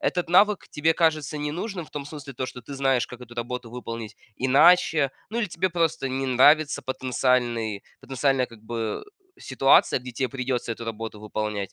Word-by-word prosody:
этот 180 Hz, -2 st, -1 dB
навык 200 Hz, +3 st, +4 dB
тебе 160 Hz, +2 st, +1 dB
кажется 155 Hz, -2 st, +1 dB
ненужным, 170 Hz, +5 st, -4 dB
в -, -, -20 dB
том 145 Hz, -1 st, -5 dB
смысле, 145 Hz, -2 st, -9 dB
то 130 Hz, -, -3 dB
что 125 Hz, -, -7 dB
ты 130 Hz, +4 st, -9 dB
знаешь, 135 Hz, -2 st, +1 dB
как 125 Hz, 0 st, -11 dB
эту 120 Hz, -1 st, -12 dB
работу 120 Hz, 0 st, -5 dB
выполнить 115 Hz, -2 st, -7 dB, 0.2 s
иначе, 140 Hz, +1 st, +4 dB, 0.2 s
ну, 230 Hz, -, -2 dB
или 235 Hz, -, +1 dB
тебе 185 Hz, +1 st, -1 dB
просто 165 Hz, -5 st, 0 dB
не 135 Hz, +1 st, -2 dB
нравится 145 Hz, +4 st, +4 dB
потенциальный 125 Hz, -5 st, 0 dB, 0.2 s
потенциальная 135 Hz, 0 st, +1 dB
как 115 Hz, -3 st, -14 dB
бы 115 Hz, -1 st, -4 dB, 0.4 s
ситуация, 135 Hz, 0 st, +3 dB
где 125 Hz, 0 st, -8 dB
те 125 Hz, +1 st, -2 dB
придется 125 Hz, -2 st, -2 dB
эту 115 Hz, -, -8 dB
работу 115 Hz, -1 st, -6 dB
выполнять. 105 Hz, -2 st, -4 dB
130 Hz, 175 wpm, -25 LUFS, 120-150 Hz, 0.4 s, навык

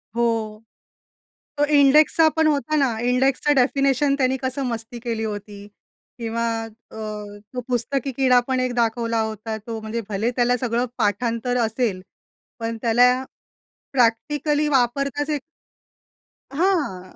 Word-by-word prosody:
हो. 225 Hz, -2 st, -1 dB, 1.0 s
तो 290 Hz, -, +3 dB
इंडेक्सचा 300 Hz, +2 st, +5 dB
पण 320 Hz, -1 st, +3 dB
होता 305 Hz, +1 st, 0 dB
ना. 265 Hz, -6 st, +1 dB
इंडेक्सचं 255 Hz, +4 st, +2 dB
डेफिनेशन 275 Hz, +1 st, +2 dB
त्यांनी 260 Hz, -1 st, +1 dB
कसं 260 Hz, +1 st, -2 dB
मस्ती 230 Hz, 0 st, -5 dB
केली 230 Hz, -2 st, -2 dB
होती 205 Hz, -1 st, -6 dB, 0.5 s
किंवा 230 Hz, 0 st, -2 dB, 0.2 s
अ, 225 Hz, +1 st, -14 dB, 0.6 s
तो 250 Hz, -, -3 dB
पुस्तकी 260 Hz, +3 st, -1 dB
कीडा 255 Hz, -2 st, +5 dB
पण 260 Hz, -1 st, 0 dB
एक 255 Hz, -1 st, -1 dB
दाखवला 230 Hz, -1 st, 0 dB
होता. 220 Hz, 0 st, -4 dB
तो 225 Hz, +1 st, -6 dB
म्हणजे 220 Hz, +2 st, -4 dB
भले 215 Hz, +4 st, 0 dB
त्याला 245 Hz, 0 st, +2 dB
सगळं 240 Hz, 0 st, 0 dB
पाठांतर 230 Hz, +4 st, 0 dB
असेल. 220 Hz, -4 st, -1 dB, 0.6 s
पण 230 Hz, 0 st, -3 dB
त्याला 245 Hz, +1 st, +5 dB, 0.8 s
प्रॅक्टिकली 290 Hz, +5 st, +1 dB
वापरताच 275 Hz, +2 st, 0 dB
येत 300 Hz, -1 st, 0 dB, 1.1 s
हां. 285 Hz, -, -1 dB
245 Hz, 120 wpm, -22 LUFS, 225-275 Hz, 1.1 s, इंडेक्सचा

